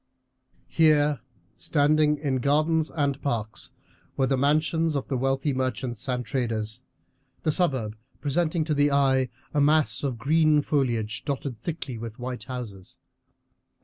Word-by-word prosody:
Here, 150 -3 +3 0.3
standing 150 0 +2
in 140 -3 -1
gardens 155 +4 +2
and 140 -3 -1
parks, 110 -5 -2 0.5
were 135 - +3
the 135 - +1
mansions 155 +3 +2
of 140 - -2
the 135 - 0
wealthy 135 +2 0
merchants 130 -1 -3
and 125 -1 -1
traders, 115 -3 -2 0.6
the 155 - +2
suburb 130 - +1 0.2
presenting 160 +3 0
to 155 0 -1
the 145 0 +3
eye 135 -2 +3 0.2
a 145 - +2
mass 150 +1 +3
of 130 -4 -1
green 150 +3 +3
foliage 120 -8 -1
dotted 135 -4 -4
thickly 150 -7 -4
with 115 -1 -7
white 125 0 -5
houses. 110 -8 -7
140 Hz, 135 wpm, -26 LUFS, 125-150 Hz, 0.6 s, Here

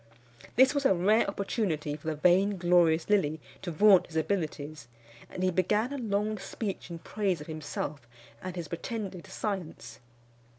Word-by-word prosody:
This 260 +3 +6
was 285 -1 0
a 195 - +4
rare 205 +6 +3
opportunity 195 -7 -2
for 155 +1 -11
the 160 - 0
vainglorious 175 -1 +3
Lilly 165 -7 +2 0.2
to 185 - -4
vaunt 195 +3 +5
his 165 - -13
abilities; 155 -5 -2 0.4
and 185 - -5
he 185 - +3
began 210 +8 +1
a 280 - -4
long 215 -2 -1
speech 195 0 -5
in 170 - -5
praise 190 0 -1
of 150 - -8
himself 150 -4 -5 0.3
and 185 -1 -6
his 170 -3 -5
pretended 185 +2 -5
science. 165 - -5
180 Hz, 155 wpm, -29 LUFS, 160-205 Hz, 0.4 s, This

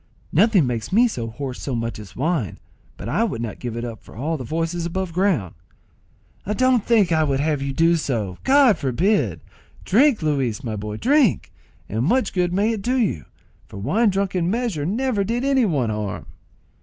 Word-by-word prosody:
"Nothing 195 - +4
makes 120 - -3
me 235 +6 +5
so 120 - -4
hoarse 130 +3 -6
so 135 - -3
much 115 -1 -3
as 105 -3 -11
wine, 145 - -1 0.4
but 100 - -7
I 165 - +1
would 205 - -2
not 115 -3 -5
give 120 -2 -5
it 120 - -3
up 115 -2 -7
for - - -16
all 150 +8 -2
the 135 - -5
voices 165 +6 -2
above 175 +1 -3
ground." 165 - +1 1.0
"Don't 255 -2 +3
think 215 -7 +3
I 160 -1 +3
would 140 -3 0
have 150 -1 0
you 140 0 -2
do 165 +5 +3
so; 110 - -3
God 270 -5 +5
forbid! 135 - +1 0.4
Drink, 245 - +3
Luis 135 -8 -1
my 115 -4 -3
boy, 105 +1 -5
drink; 270 - +2 0.4
and 110 +3 -2
much 220 - +1
good 180 -2 +1
may 200 +5 +1
it 220 -3 -3
do 250 +5 0
you, 195 - 0 0.4
for - - -11
wine 195 - +2
drunk 195 0 -1
in 175 -2 0
measure 210 -9 -1
never 225 +1 0
did 235 +5 -2
any 270 -3 +3
one 135 - 0
harm." 105 -2 -4
165 Hz, 195 wpm, -22 LUFS, -, 1.0 s, me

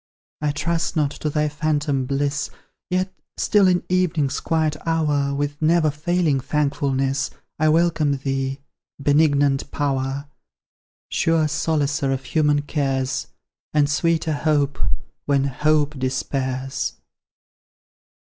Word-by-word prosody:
I 150 - +1
trust 165 +3 -1
not 150 -3 +2
to 150 - -3
thy 150 0 +1
phantom 150 -3 0
bliss, 140 +1 -1 0.4
Yet, 185 +1 0 0.2
still, 205 -2 +4
in 180 -1 +2
evening's 170 -6 +1
quiet 160 -2 0
hour, 150 -4 +1
With 145 +1 -3
never 160 -1 +3
failing 155 -1 +1
thankfulness, 140 -1 0 0.3
I 155 0 +4
welcome 160 -3 +2
thee, 135 0 -2 0.4
Benignant 145 -1 +3
Power; 135 -1 -1 0.9
Sure 165 -1 +2
solacer 150 -2 0
of 135 0 -2
human 150 -2 +2
cares, 135 -3 -1 0.5
And 145 -1 +4
sweeter 160 +2 +1
hope, 145 -1 +1 0.5
when 140 -2 +3
hope 150 +1 +1
despairs! 130 +1 -2
145 Hz, 110 wpm, -22 LUFS, 140-155 Hz, 0.9 s, still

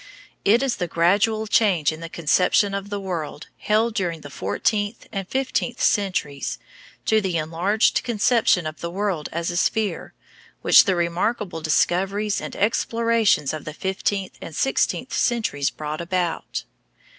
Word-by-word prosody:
It 230 +6 +4
is 265 -3 0
the 180 - -2
gradual 200 +7 +2
change 195 -9 +3
in 155 - -8
the 165 0 -7
conception 180 +5 +2
of 200 0 -4
the 205 0 -3
world 170 -5 -5
held 220 +2 +1
during 175 -6 -2
the 145 - -10
fourteenth 205 - -1
and 195 -2 -4
fifteenth 255 -1 -1
centuries 185 -9 0 0.5
to 220 0 +3
the 185 -4 -1
enlarged 170 +7 +1
conception 225 -6 +2
of 155 0 -6
the 170 - -3
world 185 -4 -2
as 170 +2 -2
a 175 - -3
sphere 215 +2 -1 0.5
which - - +7
the 190 -3 +2
remarkable 175 +1 -1
discoveries 195 +6 +1
and - - -6
explorations 230 -6 +1
of 155 - -5
the 155 - -7
fifteenth 190 +1 -2
and 165 - -8
sixteenth 270 - 0
centuries 210 - 0
brought 155 +3 -5
about. 175 -1 -2
190 Hz, 145 wpm, -23 LUFS, 165-215 Hz, 0.5 s, which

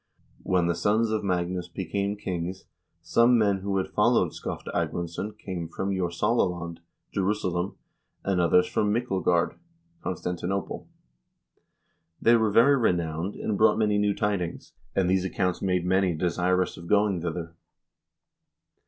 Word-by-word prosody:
" - - -36
When 90 -2 +1
the 85 - +2
sons 105 +6 +1
of 110 -1 -1
Magnus 90 -1 -1
became 100 +3 -2
kings, 90 -1 -4 0.4
some 115 +8 +4
men 100 -3 +3
who 100 0 -2
had 95 - 0
followed 115 +3 +2
Skofte - - -6
Agmundsson 85 +5 -3
came 90 -5 -5
from 95 +4 -3
Jorsala 95 +4 +1
land 85 0 -7 0.3
(Jerusalem), 95 -2 -1 0.5
and 95 -2 +1
others 90 +1 +4
from 105 -1 0
Myklegard 95 -7 0 0.4
(Constantinople). 90 +1 -3 1.3
They 115 - +5
were 110 -2 +3
very 125 +7 +5
renowned, 85 -4 0
and 110 - -2
brought 110 - +5
many 105 -2 +2
new 105 -1 +1
tidings, 100 -5 -2 0.2
and 95 -2 +2
these 95 0 +2
accounts 90 -1 -1
made 90 -2 0
many 95 -1 +2
desirous 90 +2 0
of 85 - -10
going 100 -3 +2
thither." 85 -1 -4
95 Hz, 135 wpm, -27 LUFS, 85-105 Hz, 1.3 s, They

